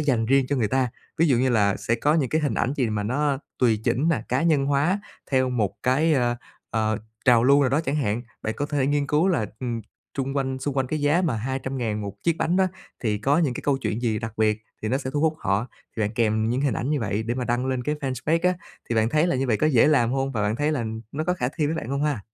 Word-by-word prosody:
dành 130 Hz, -7 st, +1 dB
riêng 135 Hz, +1 st, +3 dB
cho 145 Hz, -, 0 dB
người 115 Hz, -5 st, +1 dB
ta, 130 Hz, +1 st, +1 dB, 0.3 s
ví 165 Hz, -, +4 dB
dụ 130 Hz, -, +4 dB
như 130 Hz, +2 st, +2 dB
là 105 Hz, -4 st, +3 dB
sẽ 115 Hz, -, 0 dB
có 145 Hz, +6 st, +2 dB
những 145 Hz, -6 st, +1 dB
cái 155 Hz, -, +1 dB
hình 145 Hz, -7 st, 0 dB
ảnh 125 Hz, -, 0 dB
gì 125 Hz, -4 st, +1 dB
mà 105 Hz, -1 st, -1 dB
nó 140 Hz, +5 st, 0 dB, 0.2 s
tùy 115 Hz, -4 st, +3 dB
chỉnh 125 Hz, +6 st, +1 dB
mà 160 Hz, -8 st, +2 dB
cá 125 Hz, +5 st, +1 dB
nhân 155 Hz, -5 st, +3 dB
hóa 145 Hz, +8 st, +2 dB, 0.3 s
theo 130 Hz, -1 st, +2 dB
một 110 Hz, -6 st, -2 dB
cái, 150 Hz, +6 st, +3 dB
ơ, 120 Hz, -3 st, +1 dB, 0.3 s
ờ, 110 Hz, 0 st, 0 dB, 0.3 s
trào 120 Hz, -3 st, +5 dB
lưu 140 Hz, +2 st, +6 dB
nào 140 Hz, -, +3 dB
đó 140 Hz, +4 st, +2 dB
chẳng 150 Hz, -2 st, -2 dB
hạn. 120 Hz, -5 st, 0 dB, 0.2 s
Bạn 110 Hz, -, -2 dB
có 145 Hz, -, -1 dB
thể 145 Hz, -3 st, 0 dB
nghiên 145 Hz, 0 st, +1 dB
cứu 155 Hz, +6 st, +2 dB
là, 160 Hz, -, +1 dB
ừm, 120 Hz, -3 st, -2 dB, 0.3 s
chung 135 Hz, +1 st, -2 dB
quanh 130 Hz, -1 st, -1 dB
xung 140 Hz, +1 st, -3 dB
quanh 135 Hz, -1 st, +1 dB
cái 155 Hz, +3 st, -2 dB
giá 150 Hz, +5 st, +3 dB
mà 145 Hz, -11 st, 0 dB
200.000 125 Hz, -2 st, -2 dB
một 100 Hz, -1 st, -4 dB
chiếc 170 Hz, -1 st, +1 dB
bánh 175 Hz, +3 st, +1 dB
đó 190 Hz, 0 st, +4 dB, 0.3 s
thì 105 Hz, -3 st, 0 dB
có 140 Hz, +8 st, +2 dB
những 150 Hz, -7 st, +1 dB
cái -, -, -6 dB
câu 140 Hz, -2 st, +2 dB
chuyện 120 Hz, -3 st, -3 dB
gì 110 Hz, -3 st, +1 dB
đặc 110 Hz, +1 st, -5 dB
biệt 110 Hz, 0 st, +1 dB, 0.2 s
thì 110 Hz, -, -1 dB
nó 130 Hz, +4 st, +1 dB
sẽ 130 Hz, -2 st, -4 dB
thu 145 Hz, +1 st, -1 dB
hút 160 Hz, 0 st, +2 dB
họ, 100 Hz, +1 st, 0 dB, 0.3 s
thì -, -, -3 dB
bạn 105 Hz, -, 0 dB
kèm 110 Hz, -1 st, +1 dB
những 125 Hz, +3 st, 0 dB
hình 140 Hz, -6 st, +1 dB
ảnh 130 Hz, -, -2 dB
như 150 Hz, -2 st, +1 dB
vậy 105 Hz, -1 st, -1 dB
để 115 Hz, +2 st, -2 dB
mà 125 Hz, -1 st, -2 dB
đăng 120 Hz, +2 st, 0 dB
lên 130 Hz, -1 st, -1 dB
cái 150 Hz, +5 st, -1 dB
fanpage 150 Hz, +3 st, -1 dB
á. 185 Hz, -, +1 dB, 0.3 s
Thì 120 Hz, -, -1 dB
bạn 110 Hz, 0 st, +3 dB
thấy 155 Hz, +6 st, +2 dB
là 175 Hz, -, +1 dB
như 135 Hz, -, 0 dB
vậy 115 Hz, -4 st, +2 dB
có 155 Hz, -, +2 dB
dễ 135 Hz, -5 st, +5 dB
làm 125 Hz, -5 st, +3 dB
hông 135 Hz, 0 st, -1 dB
và 110 Hz, -4 st, -1 dB
bạn 105 Hz, +2 st, 0 dB
thấy 150 Hz, +4 st, +1 dB
là 130 Hz, -6 st, -1 dB, 0.3 s
nó 155 Hz, +2 st, -2 dB
có 180 Hz, -, +1 dB
khả 125 Hz, -7 st, -1 dB
thi 155 Hz, -3 st, +1 dB
với 160 Hz, -, -1 dB
bạn 140 Hz, -, -4 dB
hông 140 Hz, +2 st, -1 dB
ha? 145 Hz, -7 st, 0 dB
130 Hz, 285 wpm, -24 LUFS, 115-145 Hz, 0.3 s, lưu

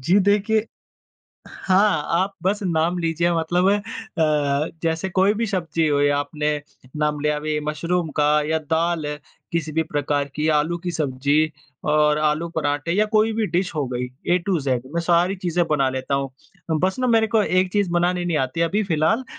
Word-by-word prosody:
जी 175 Hz, +10 st, +3 dB
देखिए 210 Hz, +2 st, +2 dB, 0.8 s
हाँ, 190 Hz, -4 st, +2 dB
आप 190 Hz, +4 st, +1 dB
बस 205 Hz, +3 st, 0 dB
नाम 170 Hz, 0 st, 0 dB
लीजिए 170 Hz, 0 st, 0 dB
मतलब 175 Hz, +3 st, +1 dB
अ, 155 Hz, -8 st, -1 dB
जैसे 165 Hz, +3 st, -1 dB
कोई 190 Hz, +3 st, +3 dB
भी 230 Hz, +1 st, -1 dB
सब्ज़ी 165 Hz, -5 st, -1 dB
हो 145 Hz, -1 st, +2 dB
या 145 Hz, 0 st, +3 dB
आपने 150 Hz, +1 st, -2 dB, 0.5 s
नाम 150 Hz, -1 st, 0 dB
लिया 150 Hz, 0 st, +1 dB
अभी 150 Hz, 0 st, -2 dB
मशरूम 170 Hz, +2 st, -1 dB
का 150 Hz, -, +3 dB, 0.2 s
या 160 Hz, 0 st, +1 dB
दाल 160 Hz, +1 st, -1 dB
है 150 Hz, 0 st, -4 dB, 0.3 s
किसी 160 Hz, -2 st, -2 dB
भी 160 Hz, +1 st, +1 dB
प्रकार 145 Hz, -2 st, -1 dB
की 155 Hz, +1 st, -1 dB
आलू 160 Hz, +4 st, -1 dB
की 175 Hz, 0 st, -4 dB
सब्ज़ी 145 Hz, +1 st, +1 dB, 0.4 s
और 150 Hz, 0 st, +3 dB
आलू 155 Hz, +2 st, 0 dB
परांठे 145 Hz, +2 st, -1 dB
या 210 Hz, +3 st, +3 dB
कोई 215 Hz, +1 st, +4 dB
भी 220 Hz, -1 st, 0 dB
डिश 180 Hz, -2 st, -1 dB
हो 145 Hz, -3 st, -1 dB
गई 125 Hz, +1 st, -2 dB, 0.3 s
ए -, -, +3 dB
टू 185 Hz, -4 st, +1 dB
ज़ेड 130 Hz, -2 st, -1 dB
मैं 170 Hz, -, +1 dB
सारी 175 Hz, +3 st, +2 dB
चीज़ें 175 Hz, -1 st, 0 dB
बना 140 Hz, -3 st, +2 dB
लेता 130 Hz, +1 st, -2 dB
हूँ। 135 Hz, -1 st, -1 dB, 0.5 s
बस 190 Hz, +3 st, 0 dB
ना 255 Hz, -, +1 dB
मेरे 225 Hz, -2 st, +3 dB
को 220 Hz, -1 st, +2 dB
एक 185 Hz, -1 st, +1 dB
चीज़ 200 Hz, -4 st, +1 dB
बनानी 175 Hz, +1 st, +1 dB
नहीं 170 Hz, -3 st, 0 dB
आती 130 Hz, +4 st, -2 dB
अभी 185 Hz, +6 st, +1 dB
फ़िलहाल 175 Hz, +9 st, +1 dB
165 Hz, 185 wpm, -22 LUFS, 150-185 Hz, 0.8 s, कोई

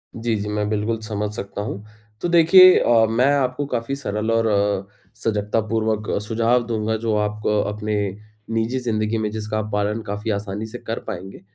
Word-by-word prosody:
जी, 115 Hz, 0 st, -1 dB
जी, 105 Hz, 0 st, -3 dB
मैं 105 Hz, 0 st, -1 dB
बिल्कुल 110 Hz, +1 st, -1 dB
समझ 105 Hz, -1 st, -3 dB
सकता 100 Hz, -2 st, -5 dB
हूँ। 105 Hz, -1 st, -5 dB, 0.4 s
तो -, -, 0 dB
देखिए 175 Hz, +2 st, +8 dB
अ, 115 Hz, -2 st, +4 dB
मैं 125 Hz, +5 st, +3 dB
आपको 135 Hz, 0 st, 0 dB
काफ़ी 125 Hz, 0 st, -2 dB
सरल 110 Hz, -5 st, -2 dB
और 115 Hz, 0 st, +2 dB
अ, 100 Hz, -2 st, +1 dB, 0.4 s
सजगतापूर्वक 110 Hz, 0 st, 0 dB
सुझाव 115 Hz, +3 st, +1 dB
दूँगा 110 Hz, -1 st, -1 dB
जो 110 Hz, -1 st, -1 dB
आपको 105 Hz, 0 st, 0 dB
अपने 105 Hz, 0 st, -3 dB, 0.6 s
निजी 115 Hz, +3 st, 0 dB
ज़िंदगी 110 Hz, -2 st, -1 dB
में 110 Hz, -1 st, -1 dB
जिसका 110 Hz, 0 st, -3 dB
पालन 105 Hz, +2 st, -1 dB
काफ़ी 105 Hz, +2 st, -3 dB
आसानी 100 Hz, +1 st, -3 dB
से 110 Hz, -, -8 dB
कर 115 Hz, -, -5 dB
पाएँगे 95 Hz, -2 st, -7 dB
110 Hz, 165 wpm, -22 LUFS, 105-115 Hz, 0.6 s, देखिए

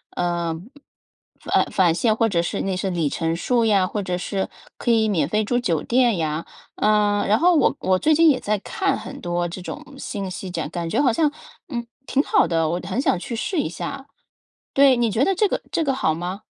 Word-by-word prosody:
呃， 170 Hz, -2 st, -1 dB, 1.0 s
呃 -, -, +5 dB
返 175 Hz, -4 st, +3 dB
现 220 Hz, +5 st, +2 dB
或 225 Hz, 0 st, +2 dB
者 170 Hz, -5 st, +1 dB
是 170 Hz, -, -2 dB
那 195 Hz, -1 st, -1 dB
些 190 Hz, +1 st, -2 dB
里 170 Hz, -4 st, 0 dB
程 165 Hz, +2 st, -1 dB
数 235 Hz, +7 st, +1 dB
呀， 200 Hz, -4 st, +3 dB
或 210 Hz, -, -3 dB
者 180 Hz, -1 st, -2 dB
是 190 Hz, +1 st, -3 dB, 0.3 s
可 240 Hz, -, -3 dB
以 220 Hz, -1 st, +3 dB
免 165 Hz, -7 st, +1 dB
费 215 Hz, +2 st, +1 dB
住 245 Hz, +3 st, 0 dB
酒 170 Hz, -10 st, 0 dB
店 240 Hz, -5 st, +2 dB
呀。 155 Hz, 0 st, -2 dB, 0.3 s
嗯， 210 Hz, -1 st, +2 dB
然 210 Hz, -, +3 dB
后 350 Hz, +1 st, +4 dB
我 300 Hz, -, +3 dB
我 185 Hz, 0 st, +2 dB
最 310 Hz, -, +3 dB
近 325 Hz, +1 st, +6 dB
也 260 Hz, -, +3 dB
在 210 Hz, 0 st, 0 dB
看 395 Hz, -, -1 dB
很 -, -, -8 dB
多 175 Hz, 0 st, -1 dB
这 175 Hz, +2 st, -7 dB
种 180 Hz, -, -7 dB
信 200 Hz, -7 st, -5 dB
息 185 Hz, +1 st, -6 dB
这 170 Hz, -, -4 dB
样， 150 Hz, -, -4 dB
感 170 Hz, 0 st, -4 dB
觉 -, -, +1 dB
好 260 Hz, -, +4 dB
像， 300 Hz, +2 st, +2 dB, 0.4 s
嗯， 235 Hz, -5 st, -4 dB, 0.2 s
挺 275 Hz, -, +2 dB
好 -, -, +3 dB
的， 165 Hz, -2 st, +1 dB
我 175 Hz, +2 st, -1 dB
很 260 Hz, -, -1 dB
想 185 Hz, -, +2 dB
去 230 Hz, +5 st, -5 dB
试 350 Hz, -, -2 dB
一 -, -, 0 dB
下。 275 Hz, -, -6 dB, 0.7 s
对， 275 Hz, -2 st, +6 dB
你 235 Hz, -2 st, +2 dB
觉 225 Hz, +6 st, +2 dB
得 390 Hz, -, +2 dB
这 420 Hz, +3 st, +3 dB
个 -, -, -2 dB
这 330 Hz, -, +1 dB
个 275 Hz, -3 st, +1 dB
好 160 Hz, -12 st, +1 dB
吗？ 180 Hz, +5 st, -5 dB
205 Hz, 245 characters per minute, -22 LUFS, 175-250 Hz, 1.0 s, 近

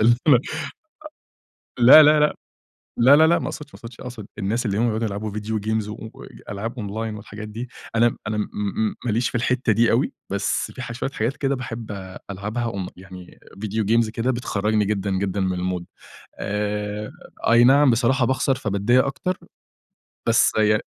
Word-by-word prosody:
اللي 120 Hz, +2 st, +5 dB
أنا 135 Hz, -, +8 dB, 1.2 s
أ 120 Hz, -, -9 dB
لا، 145 Hz, +6 st, +10 dB
لا، 150 Hz, 0 st, +6 dB
لا، 150 Hz, -, +3 dB, 0.6 s
لا، 130 Hz, +4 st, +7 dB
لا، 160 Hz, +1 st, +6 dB
لا، 170 Hz, +1 st, +4 dB
ما -, -, -4 dB
أقصدش 150 Hz, -1 st, -7 dB
ما -, -, -13 dB
أقصدش 115 Hz, 0 st, -11 dB
أقصد 120 Hz, -5 st, -8 dB
الناس 110 Hz, +4 st, -1 dB
اللي 100 Hz, 0 st, -1 dB
هم 120 Hz, -, +2 dB
بيقعدوا 115 Hz, 0 st, 0 dB
يلعبوا 105 Hz, +1 st, -4 dB
فيديو 105 Hz, +1 st, -3 dB
games 110 Hz, 0 st, -1 dB
و 110 Hz, +1 st, -9 dB, 0.3 s
ألعاب 115 Hz, +5 st, -5 dB
أونلاين 110 Hz, +1 st, -4 dB
والحاجات 105 Hz, +1 st, -9 dB
دي 115 Hz, +4 st, -6 dB, 0.3 s
أنا 120 Hz, +1 st, +3 dB
أنا 105 Hz, -, -2 dB
م 105 Hz, +1 st, -2 dB
ماليش 115 Hz, +2 st, +1 dB
في -, -, -20 dB
الحتة 120 Hz, 0 st, +1 dB
دي 115 Hz, +2 st, +3 dB
أوي، -, -, +1 dB, 0.2 s
بس -, -, -1 dB
في 130 Hz, -, -7 dB
ح 120 Hz, -, -6 dB
شوية 130 Hz, +3 st, -3 dB
حاجات 120 Hz, +2 st, -2 dB
كده 140 Hz, -1 st, 0 dB
باحب 115 Hz, -4 st, -6 dB, 0.4 s
ألعبها 105 Hz, +5 st, -3 dB
أون 100 Hz, -5 st, -3 dB
يعني 95 Hz, -1 st, -13 dB, 0.2 s
فيديو 110 Hz, +1 st, -2 dB
games 115 Hz, +1 st, +2 dB
كده 115 Hz, +2 st, -1 dB
بتخرجني 110 Hz, -4 st, 0 dB
جدًا، 100 Hz, -1 st, -1 dB
جدًا، 95 Hz, +1 st, -1 dB
من 95 Hz, -1 st, 0 dB
المود 90 Hz, -1 st, -3 dB, 0.5 s
آآ، 105 Hz, 0 st, -3 dB, 0.4 s
أي 120 Hz, +1 st, +6 dB
نعم 140 Hz, +2 st, +6 dB
بصراحة 125 Hz, +2 st, +2 dB
باخسر 130 Hz, +1 st, +1 dB
فباتضايق 115 Hz, +1 st, +2 dB
أكتر. 180 Hz, +7 st, -3 dB, 0.9 s
بس -, -, +4 dB
ي 105 Hz, 0 st, +4 dB
110 Hz, 175 wpm, -23 LUFS, 105-120 Hz, 1.2 s, لا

